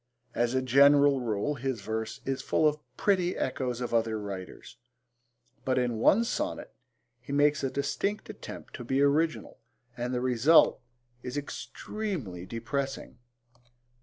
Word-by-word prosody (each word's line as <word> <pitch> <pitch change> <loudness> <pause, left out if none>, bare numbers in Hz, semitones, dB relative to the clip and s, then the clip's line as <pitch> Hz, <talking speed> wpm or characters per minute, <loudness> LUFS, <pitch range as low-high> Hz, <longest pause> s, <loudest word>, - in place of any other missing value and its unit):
As 120 +1 0
a 130 - +1
general 140 +2 +5
rule, 115 +4 -1
his 130 -4 -3
verse 110 +1 -4
is 135 0 -2
full 155 - +2
of 150 0 0 0.2
pretty 185 -3 +1
echoes 125 -2 -2
of 120 - -3
other 115 -1 +1
writers, 100 0 -8 0.9
but 130 -1 0
in 120 -3 0
one 210 - +5
sonnet 235 - -3 0.5
he 125 +3 -10
makes 145 0 +3
a 135 - +1
distinct 195 +10 -2
attempt - - -9
to - - -7
be 130 +3 0
original 155 +3 +1 0.4
and 120 +1 -3
the 125 - 0
result 130 +5 +4 0.4
is 125 +3 -5
extremely 145 - -5
depressing. 135 +3 -4
130 Hz, 135 wpm, -29 LUFS, 120-145 Hz, 0.9 s, general